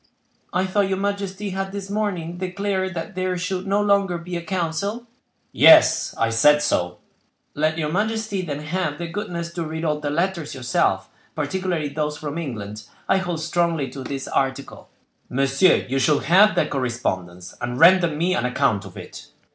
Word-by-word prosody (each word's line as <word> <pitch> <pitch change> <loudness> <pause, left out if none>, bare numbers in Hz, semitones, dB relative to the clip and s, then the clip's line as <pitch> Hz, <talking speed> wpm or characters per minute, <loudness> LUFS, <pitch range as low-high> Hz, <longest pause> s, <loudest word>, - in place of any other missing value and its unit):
"I 185 +2 +1
thought 195 +1 +1
your 190 - 0
majesty 200 0 -3
had 195 +1 -3
this 200 -1 -6
morning 180 -5 -2
declared 190 0 -2
that 170 +6 -5
there 185 0 -1
should 185 +1 -3
no 200 +1 +2
longer 200 -3 +2
be 175 +1 -7
a 170 - -2
council?" 190 +6 -2 0.5
"Yes, - - +6
I 115 0 +1
said 150 +6 +5
so." 90 -10 0 0.6
"Let 155 +2 0
your 150 -2 -1
majesty 215 +1 -1
then 150 -5 -4
have 150 -1 -2
the 170 - -4
goodness 170 -2 -5
to 170 - -3
read 160 +1 -4
all 150 -1 0
the 150 -1 -3
letters 170 0 -1
yourself, 130 -2 0 0.3
particularly 160 0 -2
those 150 +1 -2
from 150 +1 -5
England; 110 -8 -6 0.3
I 190 - +3
hold 175 -4 -3
strongly 165 -3 0
to 135 - -7
this 135 +1 -5
article." 135 0 -2 0.4
"Monsieur, 135 +7 +3
you 135 +2 0
shall 145 +3 +3
have 200 +5 +5
that - - +1
correspondence, 95 -9 -3
and 120 +1 -3
render 175 +1 +7
me 165 +4 0
an 190 - 0
account 125 -5 +1
of 95 - -11
it." - - -10
170 Hz, 170 wpm, -22 LUFS, 145-190 Hz, 0.6 s, render